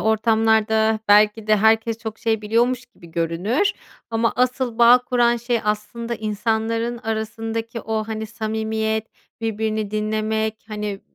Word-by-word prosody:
ortamlarda 220 0 +2
belki 210 +1 +4
de 215 0 +4
herkes 220 +2 +3
çok 220 -1 -6
şey 220 -2 0
biliyormuş 240 +4 +1
gibi 220 -8 -17
görünür 175 - 0 0.4
ama 230 0 +1
asıl 250 -1 0
bağ 240 +1 +8
kuran 240 -1 +2
şey 240 0 -1
aslında 215 +3 -2
insanların 225 +2 -1
arasındaki 225 0 -4
o, 220 0 -2
hani, 220 0 -4
samimiyet, 220 0 -2 0.3
birbirini 220 -1 -2
dinlemek, 215 +1 -1
hani, 210 -2 -4
220 Hz, 125 wpm, -22 LUFS, 215-230 Hz, 0.4 s, bağ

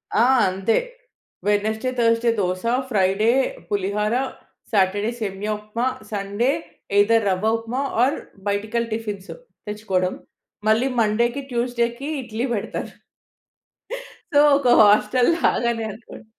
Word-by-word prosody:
ఆ! 230 - +5 0.2
అంతే. 195 +4 0 0.7
Wednesday, 220 +4 +1
Thursday 230 0 +3
dosa, 185 -1 -1 0.3
Friday 200 +1 +2 0.4
పులిహార, 205 +2 0 0.6
Saturday 205 +2 +2
సేమియా 205 0 -3
ఉప్మా, 230 +4 -2 0.2
సండే 205 +5 0 0.5
ఐదర్ 225 +1 +4
రవ్వ 190 +4 +1
ఉప్మా 235 +4 -3 0.2
ఆర్ 275 +4 +2 0.3
బయటికెళ్ళి 220 +3 -1
టిఫిన్సు 210 -3 -5 0.3
తెచ్చుకోవడం. 195 -3 -1 0.5
మళ్ళీ 225 +5 +3
మండేకి, 235 +5 +1
ట్యూస్‌డేకి 240 +2 -1
ఇడ్లీ 235 +1 -3
పెడతా. 210 - -3 1.5
సో 285 - +6 0.2
ఒక 280 - -1 0.2
హాస్టల్‌లాగానే 235 +2 +3
అనుకోండి. 225 +2 -12
220 Hz, 100 wpm, -22 LUFS, 205-235 Hz, 1.5 s, సో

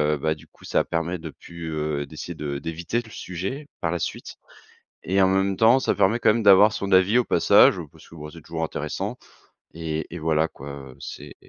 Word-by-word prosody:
heu, - - -5
bah 80 +2 0
du 75 - -17
coup - - -19
ça - - +1
permet 85 +1 -2
de 80 - -7
plus, 85 +2 -9
heu, 75 -2 -2
d'essayer 80 +3 -7
de 75 -2 -4
d'éviter 85 +9 -3
le 115 -2 -15
sujet 100 - -5
par 85 - 0
la 90 - -2
suite, - - -5 0.7
et 95 +2 +2
en 95 - +5
même 95 0 +1
temps 115 +5 +5
ça - - +1
permet 110 +5 +2
quand 110 - +4
même 115 - 0
d'avoir 100 +1 +7
son 100 0 -3
avis 95 +4 +5
au 125 - +2
passage - - +5
parce - - -18
que, - - -15
bah, 75 -1 -8
c'est 85 - -12
toujours 80 +1 -4
intéressant 80 - -4 0.6
et 80 -1 -3
et 90 - -5
voilà 80 0 +1
quoi, 70 +2 -10 0.2
heu, 65 - -15
c'est - - -9
85 Hz, 220 wpm, -24 LUFS, 80-100 Hz, 0.7 s, d'avoir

